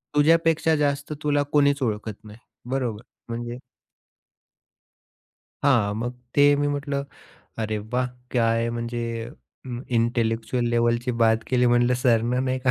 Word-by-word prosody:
"तुझ्यापेक्षा 165 Hz, +1 st, +4 dB
जास्त 145 Hz, 0 st, -1 dB
तुला 145 Hz, -1 st, +2 dB
कोणीच 145 Hz, -1 st, +3 dB
ओळखत 110 Hz, -2 st, -3 dB
नाही." 105 Hz, +2 st, -12 dB, 0.3 s
बरोबर? 120 Hz, -5 st, -2 dB, 0.3 s
म्हणजे 120 Hz, +1 st, -4 dB, 2.1 s
हां, 115 Hz, -8 st, +3 dB
मग 120 Hz, +2 st, -3 dB, 0.2 s
ते 145 Hz, -, +5 dB
मी 145 Hz, 0 st, 0 dB
म्हटलं 140 Hz, -1 st, -2 dB, 0.6 s
"अरे 110 Hz, 0 st, -2 dB
वाह! 125 Hz, +4 st, -2 dB, 0.2 s
काय 115 Hz, -1 st, +1 dB
म्हणजे 120 Hz, 0 st, -3 dB, 0.6 s
अ, -, -, -10 dB, 0.3 s
इंटेलेक्चुअल 115 Hz, 0 st, 0 dB
लेव्हलची 120 Hz, +1 st, +1 dB
बात 110 Hz, 0 st, +4 dB
केली 125 Hz, -1 st, +2 dB
म्हटलं 120 Hz, +1 st, +3 dB
सरनं 120 Hz, +1 st, +2 dB
नाही 130 Hz, 0 st, 0 dB
का?" 130 Hz, -, +6 dB
120 Hz, 125 wpm, -24 LUFS, 115-140 Hz, 2.1 s, का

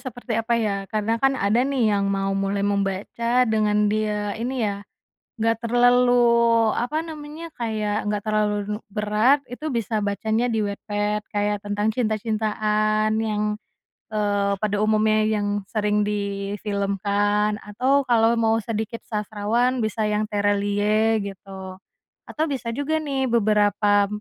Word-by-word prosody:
seperti 245 Hz, 0 st, -7 dB
apa 235 Hz, +1 st, 0 dB
ya 215 Hz, -3 st, 0 dB
karena 220 Hz, +2 st, -1 dB
kan 270 Hz, 0 st, +3 dB
ada 210 Hz, +3 st, +2 dB
nih 255 Hz, -5 st, +1 dB
yang 200 Hz, -1 st, +1 dB
mau 195 Hz, 0 st, 0 dB
mulai 195 Hz, +1 st, -1 dB
membaca 205 Hz, +5 st, 0 dB
dengan 210 Hz, -2 st, +2 dB
dia 210 Hz, -1 st, -1 dB
ini 250 Hz, 0 st, -1 dB
ya, 200 Hz, -1 st, -2 dB, 0.6 s
gak 225 Hz, 0 st, +1 dB
terlalu 245 Hz, +1 st, +4 dB, 0.6 s
apa 305 Hz, +7 st, -1 dB
namanya? 310 Hz, +1 st, -8 dB
Kayak 215 Hz, -2 st, -2 dB
gak 210 Hz, -1 st, -1 dB
terlalu 210 Hz, -1 st, +1 dB, 0.2 s
nu -, -, -8 dB
berat 215 Hz, +7 st, +2 dB
itu 300 Hz, +6 st, -5 dB
bisa 225 Hz, -2 st, -1 dB
bacanya 220 Hz, +4 st, 0 dB
di 220 Hz, -2 st, 0 dB
Wattpad 205 Hz, +1 st, -2 dB
kayak 205 Hz, -1 st, -1 dB
tentang 205 Hz, +1 st, -1 dB
cinta-cintaan 215 Hz, -1 st, 0 dB
yang, 210 Hz, -1 st, -1 dB, 0.7 s
eee, 205 Hz, -1 st, +1 dB
pada 205 Hz, -1 st, 0 dB
umumnya 215 Hz, 0 st, +3 dB
yang 210 Hz, -1 st, 0 dB, 0.2 s
sering 210 Hz, 0 st, 0 dB
difilmkan 205 Hz, 0 st, -1 dB
atau 260 Hz, +7 st, 0 dB
kalau 230 Hz, -1 st, +3 dB
mau 225 Hz, 0 st, +2 dB
sedikit 220 Hz, +1 st, -4 dB
sastrawan 220 Hz, +4 st, -1 dB
bisa 215 Hz, 0 st, -1 dB
yang 210 Hz, 0 st, -1 dB
Tere 205 Hz, 0 st, +1 dB
Liye 210 Hz, +2 st, +1 dB
gitu, 190 Hz, -1 st, -9 dB, 0.5 s
atau 310 Hz, -, -2 dB
bisa 245 Hz, -4 st, -3 dB
juga 285 Hz, +5 st, -1 dB
nih 270 Hz, -2 st, -1 dB
beberapa, 205 Hz, -2 st, +3 dB
215 Hz, 135 wpm, -23 LUFS, 205-230 Hz, 0.7 s, terlalu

